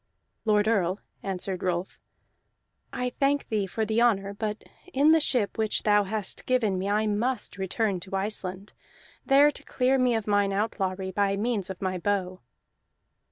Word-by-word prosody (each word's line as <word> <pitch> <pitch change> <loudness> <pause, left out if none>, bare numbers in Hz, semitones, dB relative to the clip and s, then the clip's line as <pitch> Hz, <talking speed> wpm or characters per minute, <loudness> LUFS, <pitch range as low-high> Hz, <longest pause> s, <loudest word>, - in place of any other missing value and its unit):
"Lord 210 -1 +3
Earl," 195 -3 +1 0.2
answered 190 -1 -4
Rolf, 180 0 -2 0.9
"I 250 0 -2
thank 280 +1 +1
thee 210 -3 0
for 220 +4 -2
the 220 +2 +1
honor, 200 -4 +2
but 210 +1 -4 0.3
in 290 +2 +4
the 320 - +6
ship 245 -8 +1
which 220 -1 0
thou 205 -1 +4
hast 205 0 -1
given 220 -7 +1
me 195 +2 -2
I 210 +1 +2
must 215 0 -2
return 190 0 -1
to 190 +2 -6
Iceland, 195 -1 -3 0.5
there 285 +2 +6
to - - -10
clear 260 +1 +1
me 250 -2 +3
of 220 -2 -2
mine 205 -1 +2
outlawry 195 -2 -2
by 195 +1 +1
means 210 -3 -1
of 190 0 -6
my 185 -1 -1
bow." 185 -1 -1
205 Hz, 160 wpm, -27 LUFS, 190-230 Hz, 0.9 s, the